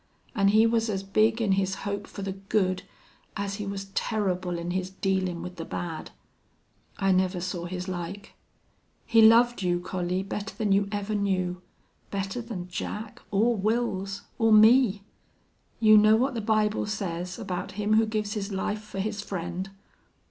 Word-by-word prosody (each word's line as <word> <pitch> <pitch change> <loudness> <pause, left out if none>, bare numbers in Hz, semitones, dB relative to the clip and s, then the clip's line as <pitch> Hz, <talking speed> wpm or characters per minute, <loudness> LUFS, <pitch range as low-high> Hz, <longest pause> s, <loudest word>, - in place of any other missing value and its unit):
An' 200 -5 +2
he 215 +3 +5
was 230 0 +1
as 195 -2 -2
big 215 +3 +2
in 205 - +1
his 190 0 +1
hope 200 0 -3
fer 200 - -7
the 195 - -2
good 190 -1 0 0.6
as 200 0 -3
he 210 -2 -5
was 195 0 -4
terrible 185 -5 -1
in 170 +1 -4
his 185 0 -2
dealin' 190 -2 -1
with 180 0 -8
the 165 - -4
bad. 165 -1 -5 0.9
I 195 -1 +2
never 185 0 +2
saw 175 -1 -4
his 180 +1 -5
like.... 185 +2 -6 0.7
He 225 - +5
loved 235 +1 +6
you, 175 -1 +1
Collie, 180 +1 -2
better 200 +1 -5
than 210 -2 -1
you 200 0 +3
ever 205 0 -2
knew. 185 -3 -1 0.5
Better 195 +4 -3
than 210 -7 -6
Jack, 210 +4 -6
or 220 +4 +2
Wils, 200 -2 -1 0.2
or 225 -1 +4
me! 215 -1 +6 0.8
You 215 -2 +7
know 215 +1 +6
what 260 +4 +1
the 230 - -3
Bible 215 -1 +1
says 180 -4 -3
about 180 -1 -4
him 210 +2 0
who 220 +1 +4
gives 215 -1 -2
his 205 -1 -4
life 205 +2 -2
fer 210 -2 -10
his 205 +1 -2
friend. 180 -1 -4
200 Hz, 170 wpm, -27 LUFS, 185-215 Hz, 0.9 s, You